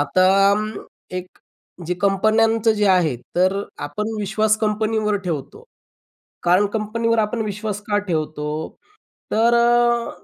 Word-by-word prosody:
आता 165 +6 +2 0.3
अं, 210 +1 0 0.5
एक 180 0 -8 0.5
जे 180 - -1
कंपन्यांचं 220 +3 +3
जे 210 -1 +1
आहे, 175 -8 +3 0.2
तर 185 +3 +2 0.2
आपण 210 +9 -4
विश्वास 215 +1 +1
कंपनीवर 215 0 0
ठेवतो. 155 -7 -5 0.8
कारण 180 +4 +3
कंपनीवर 230 +2 0
आपण 220 +1 0
विश्वास 210 0 -4
का 205 -1 +2
ठेवतो? 155 -2 -3 0.6
तर 230 +2 +3
अ, 235 0 +3
210 Hz, 115 wpm, -21 LUFS, 185-220 Hz, 0.8 s, कंपन्यांचं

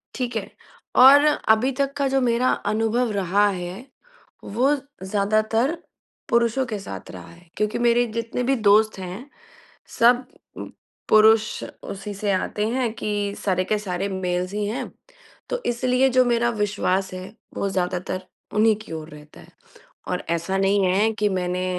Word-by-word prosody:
ठीक 245 -2 -3
है, 215 -3 -3 0.5
और 275 +3 +8
अभी 255 -4 +2
तक 275 0 0
का 280 - +1
जो 270 0 +1
मेरा 245 +1 +2 0.2
अनुभव 225 +2 0
रहा 200 +1 +2
है, 185 +4 -6 0.6
वो 255 +8 +1 0.3
ज़्यादातर 215 - +1 0.5
पुरुषों 235 +2 +2
के 215 -4 -4
साथ 195 - -8
रहा - - -10
है, 170 0 -19
क्योंकि 210 +1 0
मेरे 240 0 +3
जितने 230 +2 -3
भी 270 +2 +2
दोस्त 215 -2 +3
हैं, 190 +9 -7 0.7
सब 245 +2 +5 0.3
उ - - -6 0.4
पुरुष 215 0 +4 0.2
उसी 200 +1 -6
से 200 +1 -1
आते 210 +2 -1
हैं 250 -1 -1
कि 205 -2 -2
सारे 185 -2 0
के 215 - +1
सारे 195 -1 -3
मेल्स 180 -1 -2
ही 210 0 -1
हैं, 220 +4 -4 0.6
तो - - -2
इसलिए 250 +2 +2
जो 255 0 +4
मेरा 235 0 +2
विश्वास 200 -4 -1
है, 185 +3 -8 0.2
वो 200 - -1
ज़्यादातर 185 0 -2 0.3
उन्हीं 215 +1 +4
की - - -12
ओर 160 0 -7
रहता 150 -1 -14
है। - - -16 0.6
और - - -2
ऐसा 170 +3 -1
नहीं 195 +1 +2
है, 200 +5 +2
कि 210 -1 0
मैंने 180 -1 -2
215 Hz, 155 wpm, -23 LUFS, 190-240 Hz, 0.7 s, और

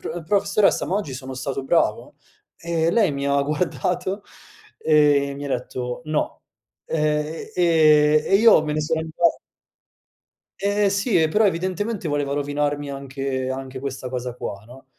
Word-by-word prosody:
"Pro 175 - -5
professoressa 200 +2 +2
ma 190 - -1
oggi 175 -10 -3
sono 130 0 -7
stato 135 +1 -4
bravo?" 165 +5 0 0.4
E 165 -1 0
lei 195 -6 +3
mi 140 0 -3
ha 140 0 +2
guardato 180 +6 -2 0.6
e 145 -2 +3
mi 145 - -7
ha - - -4
detto: 125 0 -4
"No." 155 -1 -2 0.5
Ehm, 150 0 -1
e 155 -3 +4
e - - +2
io 215 -6 +6
me 150 - -2
ne 155 - -1
sono 160 +1 -1
andat 160 +1 +1 1.2
Eh 205 +1 +2
sì, 200 -1 +1
e 160 - +3
però 210 +7 +2
evidentemente 185 +1 -1
voleva 145 -1 -1
rovinarmi 145 0 -1
anche 135 -1 -4
anche 130 0 -5
questa 130 -1 -5
cosa 125 -1 -4
qua 100 -4 -6
no? 130 +4 -15
150 Hz, 150 wpm, -22 LUFS, 140-175 Hz, 1.2 s, io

